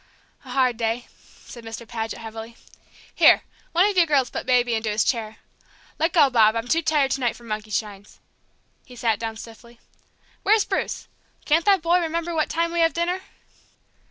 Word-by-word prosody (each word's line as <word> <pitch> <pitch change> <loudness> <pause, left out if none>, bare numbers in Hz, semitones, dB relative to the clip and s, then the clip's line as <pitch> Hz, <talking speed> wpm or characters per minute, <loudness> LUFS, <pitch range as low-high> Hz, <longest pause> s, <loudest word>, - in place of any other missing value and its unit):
"A - - -14
hard 255 -3 +1
day," 230 +1 -2
said 235 - -15
Mr. 225 +1 -8
Paget, 225 -1 -4
heavily. 225 0 -9 0.6
"Here, - - +6 0.3
one 350 +4 +4
of 415 - -2
you 345 -2 +4
girls 275 -4 +2
put - - -5
Baby 245 -2 +3
into 220 -1 -1
his 210 0 +1
chair. 225 -3 -2 0.6
Let 325 +2 +1
go, 305 -5 +6
Bob, 220 -2 +4
I'm 230 +1 -3
too 325 +6 +2
tired 300 -4 +1
to - - 0
night 245 -3 0
for 240 - -15
monkey 215 -1 -5
shines!" 205 -1 -5 0.6
He 250 - -15
sat 225 -3 0
down 225 -1 -4
stiffly. 235 +1 -13 0.6
"Where's 425 +1 +3
Bruce? - - -3 0.4
Can't 320 +2 +2
that 390 -5 +4
boy 345 +2 +3
remember 335 0 -2
what 315 -1 0
time 335 0 0
we 340 - -2
have 330 0 +3
dinner?" 350 +2 -1
245 Hz, 185 wpm, -23 LUFS, 225-330 Hz, 0.6 s, Here